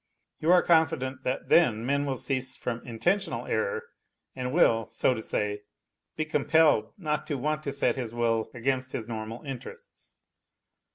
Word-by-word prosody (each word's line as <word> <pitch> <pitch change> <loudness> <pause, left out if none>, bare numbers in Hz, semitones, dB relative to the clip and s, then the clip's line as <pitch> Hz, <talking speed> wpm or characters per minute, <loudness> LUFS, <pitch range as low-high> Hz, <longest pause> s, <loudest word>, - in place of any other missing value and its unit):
You 160 +3 +2
are 180 -1 +6
confident 160 -6 +2
that 130 +1 -2
then 120 -10 +4
man 140 +2 +1
will 135 -2 -1
cease 130 0 -2
from 120 -1 -3
intentional 175 - -1
error 470 -1 -1 0.5
and 125 -1 -3
will, 115 -8 +3
so 130 - +2
to 110 - -5
Bay, 105 0 -1 0.5
be 155 - -1
compelled 155 -6 +3
not 150 -5 -2
to 145 - -2
want 150 +3 -1
to 140 - -1
set 140 0 +1
his 120 -4 -3
will 115 -1 0
against 130 +1 -1
his 110 - -4
normal 110 0 -6
interests. 135 -4 -9
130 Hz, 160 wpm, -28 LUFS, 115-155 Hz, 0.5 s, are